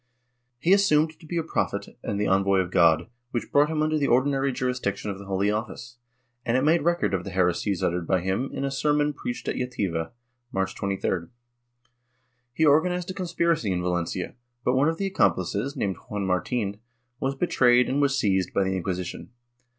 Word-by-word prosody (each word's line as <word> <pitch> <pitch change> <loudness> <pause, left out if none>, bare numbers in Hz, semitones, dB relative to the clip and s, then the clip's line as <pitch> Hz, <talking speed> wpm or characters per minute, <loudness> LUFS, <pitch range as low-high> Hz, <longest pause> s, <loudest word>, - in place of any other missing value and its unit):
He 170 +9 +3
assumed 160 -6 +3
to - - -15
be 170 - -3
a 165 - +1
prophet 160 - -2
and 100 - -3
the 105 - +1
envoy 95 0 +3
of 90 -1 0
God, 85 -3 +4 0.2
which 120 -2 -4
brought 145 +1 +4
him 155 -1 0
under 155 0 +1
the 140 - +1
ordinary 135 +2 +2
jurisdiction 125 -6 -2
of 95 - -7
the 100 - -9
Holy 100 +1 +1
Office, 115 +2 -5 0.5
and 120 +1 +1
it 130 - +1
made 160 +3 +4
record 170 -6 +1
of 90 -2 0
the 100 - -6
heresies 90 +1 0
uttered 85 -1 -1
by 95 -2 +2
him 95 +9 -1
in 140 - -3
a 135 - -2
sermon 150 +1 +1
preached 120 -3 -5
at - - -1
Jativa, 95 -10 -2 0.4
March 95 0 -1
23d. 95 -3 -2 1.2
He 160 +6 +1
organized 175 +5 +3
a - - -6
conspiracy 170 - 0
in 90 -1 -1
Valencia, 90 0 -2 0.3
but 125 - +3
one 135 +4 +3
of 165 - -2
the 195 - -2
accomplices, 115 - 0
named 95 -2 -1
Juan 105 -1 -2
Martin, 100 +2 -1 0.4
was 135 +1 -1
betrayed 125 -6 +3
and 140 +2 0
was 140 -1 +2
seized, 95 -7 +1
by 100 - +3
the 95 0 -1
Inquisition. 90 -1 -4
120 Hz, 190 wpm, -26 LUFS, 95-150 Hz, 1.2 s, God